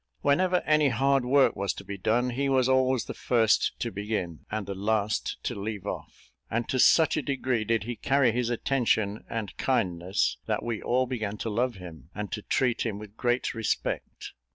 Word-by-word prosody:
Whenever 180 Hz, +5 st, +2 dB
any 150 Hz, -2 st, +4 dB
hard 135 Hz, +2 st, +2 dB
work 135 Hz, +2 st, +4 dB
was 100 Hz, 0 st, -1 dB
to -, -, -8 dB
be 100 Hz, -, -6 dB
done, 120 Hz, +6 st, +1 dB
he 140 Hz, +3 st, -1 dB
was 130 Hz, -2 st, +3 dB
always 130 Hz, -2 st, +2 dB
the -, -, -5 dB
first 115 Hz, -3 st, +2 dB
to -, -, -2 dB
begin, 100 Hz, -5 st, -4 dB
and 110 Hz, -1 st, -3 dB
the 100 Hz, -, -4 dB
last 105 Hz, +1 st, -1 dB
to -, -, -2 dB
leave 100 Hz, -1 st, -5 dB
off; -, -, -7 dB, 0.2 s
and 115 Hz, +1 st, -1 dB
to 130 Hz, -, -1 dB
such 160 Hz, +4 st, +5 dB
a -, -, +1 dB
degree 130 Hz, -4 st, -1 dB
did 115 Hz, 0 st, 0 dB
he 120 Hz, +2 st, -4 dB
carry 135 Hz, +2 st, +2 dB
his 120 Hz, +1 st, -1 dB
attention 115 Hz, -4 st, 0 dB
and 110 Hz, -4 st, -4 dB
kindness, 95 Hz, -8 st, 0 dB
that -, -, -1 dB
we 115 Hz, -2 st, -3 dB
all 130 Hz, +1 st, +1 dB
began 110 Hz, -5 st, -3 dB
to 110 Hz, -, -3 dB
love 120 Hz, +3 st, 0 dB
him, 80 Hz, -6 st, -11 dB
and 105 Hz, -1 st, -5 dB
to 105 Hz, -, -3 dB
treat 125 Hz, +2 st, +1 dB
him 110 Hz, -4 st, -2 dB
with 105 Hz, 0 st, -10 dB
great 120 Hz, +1 st, 0 dB
respect. 115 Hz, -3 st, -3 dB
115 Hz, 195 wpm, -27 LUFS, 105-130 Hz, 0.2 s, such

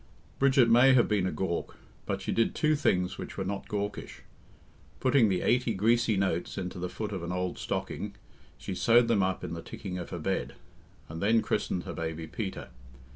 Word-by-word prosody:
Bridget 135 Hz, -3 st, +5 dB
may 125 Hz, +3 st, +6 dB
have 120 Hz, -, +5 dB
been 100 Hz, -3 st, +1 dB
a -, -, -1 dB
gawk, 95 Hz, -3 st, -3 dB, 0.3 s
but -, -, -2 dB
she -, -, -2 dB
did 115 Hz, -, +1 dB
two 155 Hz, 0 st, +2 dB
things 90 Hz, -11 st, 0 dB
which -, -, -7 dB
were 95 Hz, -, -2 dB
not 100 Hz, +1 st, -4 dB
gawkish. 100 Hz, 0 st, -4 dB, 0.8 s
Putting 130 Hz, -4 st, +4 dB
the 90 Hz, -2 st, 0 dB
eighty 125 Hz, -3 st, +2 dB
greasy 115 Hz, +2 st, +2 dB
notes 95 Hz, -2 st, -1 dB
into 90 Hz, -1 st, -4 dB
the 90 Hz, 0 st, -3 dB
foot 105 Hz, +2 st, -5 dB
of 95 Hz, -3 st, -4 dB
an 85 Hz, +1 st, -4 dB
old 90 Hz, 0 st, -2 dB
stocking, -, -, -4 dB, 0.4 s
she -, -, -5 dB
sewed 120 Hz, +1 st, +4 dB
them 110 Hz, -4 st, +3 dB
up 95 Hz, 0 st, -1 dB
in -, -, -4 dB
the 85 Hz, -, -5 dB
ticking 90 Hz, 0 st, -6 dB
of 90 Hz, -, -6 dB
her -, -, -5 dB
bed, -, -, -2 dB, 0.5 s
and 80 Hz, +1 st, -7 dB
then 110 Hz, +3 st, +3 dB
christened 90 Hz, -, -1 dB
her -, -, -6 dB
baby 80 Hz, 0 st, -4 dB
Peter. 95 Hz, +3 st, -5 dB
100 Hz, 195 wpm, -29 LUFS, 90-115 Hz, 0.8 s, may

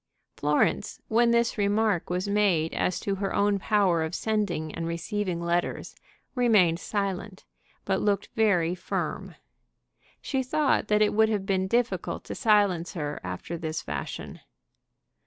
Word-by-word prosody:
Florence, 150 Hz, +7 st, 0 dB
when 235 Hz, +2 st, +4 dB
this 235 Hz, -1 st, +2 dB
remark 205 Hz, -2 st, +1 dB
was 180 Hz, +2 st, -1 dB
made 200 Hz, -6 st, +2 dB
as 180 Hz, -, 0 dB
to 200 Hz, -, -2 dB
her 195 Hz, -, -1 dB
own 200 Hz, 0 st, +2 dB
power 190 Hz, -5 st, +2 dB
of 160 Hz, +2 st, -2 dB
sending 200 Hz, -8 st, -1 dB
and 165 Hz, 0 st, -4 dB
receiving 170 Hz, +2 st, -2 dB
letters, 170 Hz, +1 st, -1 dB, 0.4 s
remained 210 Hz, -10 st, +3 dB
silent, 200 Hz, -1 st, -3 dB, 0.4 s
but 190 Hz, -1 st, 0 dB
looked 200 Hz, -1 st, 0 dB
very 180 Hz, -7 st, +2 dB
firm. 180 Hz, -, -4 dB, 0.8 s
She 265 Hz, -2 st, -1 dB
thought 265 Hz, -2 st, +1 dB
that 210 Hz, 0 st, +4 dB
it 210 Hz, -, +1 dB
would 220 Hz, +1 st, +4 dB
have 205 Hz, -3 st, -1 dB
been 190 Hz, -1 st, 0 dB
difficult 240 Hz, +3 st, -1 dB
to -, -, -6 dB
silence 205 Hz, -7 st, +2 dB
her 150 Hz, -4 st, -4 dB
after 90 Hz, -, -5 dB
this 160 Hz, -1 st, -4 dB
fashion. -, -, -6 dB
200 Hz, 140 wpm, -27 LUFS, 170-215 Hz, 0.8 s, when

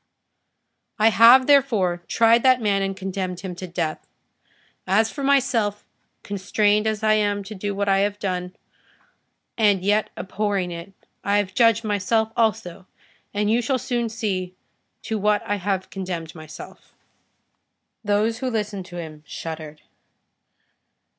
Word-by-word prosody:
I 220 Hz, 0 st, +5 dB
have, 235 Hz, +4 st, +7 dB
therefore, 225 Hz, -12 st, +3 dB
tried 230 Hz, +1 st, +4 dB
that 255 Hz, 0 st, +4 dB
man, 205 Hz, -3 st, +1 dB
and 195 Hz, 0 st, -2 dB
condemned 185 Hz, -2 st, -4 dB
him 190 Hz, -2 st, -5 dB
to 185 Hz, -, -6 dB
death. 170 Hz, -3 st, -4 dB, 0.8 s
As 220 Hz, +4 st, +2 dB
for 280 Hz, -, -6 dB
myself, 245 Hz, -7 st, +1 dB, 0.4 s
constrained 205 Hz, +2 st, +1 dB
as 215 Hz, 0 st, -2 dB
I 215 Hz, 0 st, +4 dB
am 205 Hz, -1 st, +1 dB
to 215 Hz, -, -8 dB
do 205 Hz, 0 st, -4 dB
what 200 Hz, 0 st, -1 dB
I 195 Hz, 0 st, +3 dB
have 205 Hz, +1 st, 0 dB
done, 180 Hz, -2 st, -4 dB, 1.0 s
and 200 Hz, -4 st, +3 dB
yet 210 Hz, +1 st, +2 dB
abhorring 195 Hz, -1 st, -2 dB
it, 170 Hz, +3 st, -8 dB, 0.3 s
I 200 Hz, +1 st, +2 dB
have 200 Hz, -2 st, -1 dB
judged 230 Hz, 0 st, +3 dB
myself 220 Hz, +2 st, 0 dB
also, 205 Hz, -6 st, -1 dB, 0.4 s
and 210 Hz, +1 st, 0 dB
you 235 Hz, +2 st, +3 dB
shall 260 Hz, +3 st, 0 dB
soon 240 Hz, -2 st, -2 dB
see 190 Hz, -5 st, -3 dB, 0.5 s
to 220 Hz, -1 st, -3 dB
what 210 Hz, 0 st, +1 dB
I 205 Hz, -, -1 dB
have 195 Hz, -1 st, -2 dB
condemned 180 Hz, -4 st, -5 dB
myself." 155 Hz, -1 st, -12 dB, 1.1 s
Those 215 Hz, +2 st, +1 dB
who 260 Hz, 0 st, -2 dB
listened 210 Hz, -5 st, -3 dB
to 175 Hz, -, -11 dB
him 160 Hz, -3 st, -7 dB
shuddered. 155 Hz, -2 st, -7 dB
205 Hz, 140 wpm, -23 LUFS, 185-220 Hz, 1.1 s, have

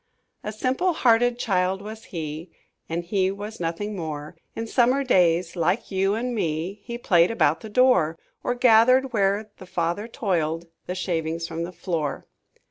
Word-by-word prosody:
"A 210 Hz, -, -3 dB
simple 260 Hz, -, 0 dB
hearted 245 Hz, -4 st, +3 dB
child 190 Hz, -4 st, 0 dB
was 220 Hz, +2 st, -8 dB
he, 160 Hz, 0 st, -6 dB, 0.4 s
And 170 Hz, +1 st, -2 dB
he 190 Hz, +1 st, +1 dB
was 205 Hz, +3 st, -6 dB
nothing 175 Hz, +5 st, -3 dB
more; 155 Hz, -4 st, -5 dB, 0.2 s
In 225 Hz, -, -3 dB
summer 255 Hz, +4 st, +2 dB
days, 175 Hz, -7 st, +2 dB
like 180 Hz, +6 st, 0 dB
you 195 Hz, +1 st, +1 dB
and 245 Hz, +2 st, -2 dB
me, 175 Hz, 0 st, -2 dB
He 235 Hz, +1 st, -5 dB
played 175 Hz, -7 st, +4 dB
about 160 Hz, -8 st, +2 dB
the 220 Hz, -, -8 dB
door, 205 Hz, -9 st, +3 dB, 0.3 s
Or 245 Hz, -, 0 dB
gathered, 250 Hz, +2 st, +5 dB
where 205 Hz, 0 st, +1 dB
the 185 Hz, -, -11 dB
father 175 Hz, +5 st, -2 dB
toiled, 170 Hz, -, -1 dB, 0.2 s
The 180 Hz, -, -3 dB
shavings 165 Hz, -2 st, -2 dB
from 165 Hz, 0 st, -4 dB
the 175 Hz, -, -7 dB
floor." 160 Hz, -6 st, -3 dB
195 Hz, 160 wpm, -24 LUFS, 170-230 Hz, 0.4 s, gathered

